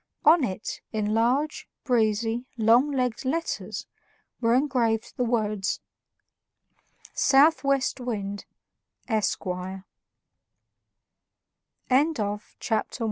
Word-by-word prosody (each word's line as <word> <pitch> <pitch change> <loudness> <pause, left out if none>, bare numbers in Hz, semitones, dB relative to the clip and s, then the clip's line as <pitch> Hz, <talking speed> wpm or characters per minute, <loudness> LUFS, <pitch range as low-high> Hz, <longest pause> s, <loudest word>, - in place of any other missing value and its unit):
On 310 +1 +6
it, 195 -3 -4
in 215 -1 -1
large, 255 +7 0
breezy, 225 0 +1
long 235 +5 +4
legged 250 -4 -1
letters, 325 +6 -3 0.5
were 230 0 +3
engraved 245 -5 0
the 250 - 0
words: 215 -4 0 1.3
SOUTH 295 +4 +4
WEST 275 -1 +1
WIND, 205 -5 -4 0.6
ESQUIRE 190 -4 -2 2.0
CHAPTER 255 - +2
II 290 +5 +5 0.2
OF 205 +1 -7
THE - - -9
PROCEE 220 -2 -1
235 Hz, 95 wpm, -26 LUFS, 215-265 Hz, 2.0 s, On